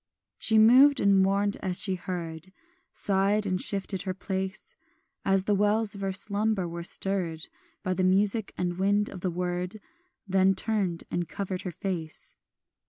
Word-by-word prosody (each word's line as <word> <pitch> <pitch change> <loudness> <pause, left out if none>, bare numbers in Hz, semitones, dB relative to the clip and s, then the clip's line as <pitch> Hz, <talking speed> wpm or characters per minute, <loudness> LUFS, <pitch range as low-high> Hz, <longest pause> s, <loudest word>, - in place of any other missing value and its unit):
She 220 - +3
moved 260 +6 +7
and 200 -1 +4
mourned 200 +2 +1
as 185 -2 -1
she 195 -3 +1
heard, 175 -2 -5 0.4
Sighed 200 +2 +1
and 185 -2 -1
shifted 195 -1 -1
her 185 -2 -3
place, 190 +1 -5 0.5
As 195 -1 +2
the 210 - +2
wells 210 +1 +1
of 200 - -9
her 195 0 -1
slumber 200 0 -1
were 170 0 -6
stirred 175 -3 -1 0.4
By 185 - 0
the 185 - -1
music 200 +3 +2
and 175 0 -2
wind 205 +2 +2
of 185 - -9
the 185 - -1
word, 180 +3 -3 0.5
Then 190 0 +3
turned 190 -4 -1
and 175 -1 -2
covered 190 -1 -4
her 180 - -5
face. 170 -3 -5
190 Hz, 160 wpm, -27 LUFS, 180-205 Hz, 0.5 s, moved